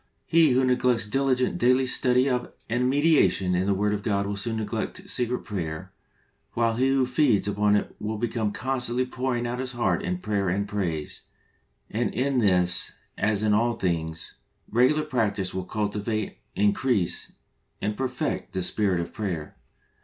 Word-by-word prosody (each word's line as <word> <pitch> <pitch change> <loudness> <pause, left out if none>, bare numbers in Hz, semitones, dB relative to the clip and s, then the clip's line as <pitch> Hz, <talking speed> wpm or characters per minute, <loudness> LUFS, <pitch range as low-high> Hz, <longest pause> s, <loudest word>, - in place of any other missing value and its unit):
He 160 -5 +4
who 130 +1 +3
neglects 125 -3 +2
diligent, 130 +2 +1
daily 130 +2 +4
study 125 0 +3
of 125 -2 -1 0.2
and 125 +2 +1
meditation 140 - +3
in 90 +2 +1
the 100 - +2
Word 105 +2 +1
of 105 - -2
God 100 -1 0
will 100 0 -3
soon 115 +3 -2
neglect 110 -2 -4
secret 125 0 0
prayer, 80 -7 -5 0.6
while 115 -1 +1
he 130 +2 +3
who 135 -1 +3
feeds 125 -5 +2
upon 105 0 +2
it 105 - -1
will 110 +1 -3
be 120 - 0
constantly 120 +3 -1
pouring 125 -1 -2
out 120 +1 -3
his 130 0 -3
heart 95 -8 0
in 90 0 -2
prayer 100 0 -1
and 100 +3 -1
praise, 85 -8 -3 0.7
and 115 0 -2
in 130 +2 +1
this 90 -4 +3 0.2
as 105 +1 0
in 105 -1 +3
all 120 +3 +2
things, 80 -5 -3 0.3
regular 130 +7 +3
practice 105 -10 -1
will 95 -1 -3
cultivate, 105 +1 -2 0.2
increase 105 -1 +1 0.5
and 105 +1 -2
perfect 130 +2 -3
the 95 - -1
spirit 95 -2 +1
of 85 - -5
prayer. 90 -8 -4
110 Hz, 160 wpm, -26 LUFS, 100-125 Hz, 0.7 s, He